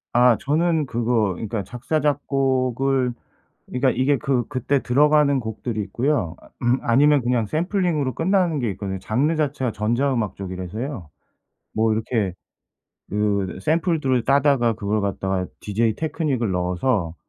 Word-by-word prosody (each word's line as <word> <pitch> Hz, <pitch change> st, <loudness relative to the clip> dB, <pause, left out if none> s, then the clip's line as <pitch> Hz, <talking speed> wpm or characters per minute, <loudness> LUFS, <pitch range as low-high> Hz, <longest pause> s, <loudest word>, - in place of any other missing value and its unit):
아 120 Hz, -2 st, +5 dB
저는 160 Hz, +2 st, +1 dB
그거 115 Hz, -5 st, 0 dB
그러니까 105 Hz, +2 st, -4 dB
작사 125 Hz, -, -2 dB
작곡을 135 Hz, -3 st, +1 dB, 0.5 s
그러니까 130 Hz, +1 st, +1 dB
이게 135 Hz, +2 st, +2 dB
그 135 Hz, -5 st, 0 dB
그때 135 Hz, 0 st, -1 dB
들어가는 145 Hz, +1 st, +4 dB
곡들이 110 Hz, -1 st, -4 dB
있고요. 115 Hz, -, -1 dB
아 -, -, -18 dB
음 120 Hz, +1 st, +3 dB
아니면 145 Hz, +4 st, +4 dB
그냥 120 Hz, -2 st, +1 dB
샘플링으로 165 Hz, -, 0 dB
끝나는 175 Hz, -, +1 dB
게 120 Hz, -, -1 dB
있거든요. 95 Hz, 0 st, -5 dB
장르 125 Hz, -, 0 dB
자체가 145 Hz, -5 st, -1 dB
전자 120 Hz, +7 st, 0 dB
음악 110 Hz, -5 st, -2 dB
쪽이라서요. 95 Hz, -, -6 dB, 0.6 s
뭐 110 Hz, 0 st, +2 dB
이렇게 110 Hz, -3 st, -1 dB, 0.8 s
그 105 Hz, -1 st, +1 dB
으 -, -, -11 dB
샘플들을 155 Hz, -, +1 dB
따다가 140 Hz, -4 st, +3 dB
그걸 105 Hz, 0 st, -1 dB
갖다가 95 Hz, -1 st, -1 dB, 0.2 s
DJ 110 Hz, +1 st, 0 dB
테크닉을 150 Hz, -, -1 dB
넣어서 90 Hz, 0 st, 0 dB
125 Hz, 325 characters per minute, -22 LUFS, 105-145 Hz, 0.8 s, 아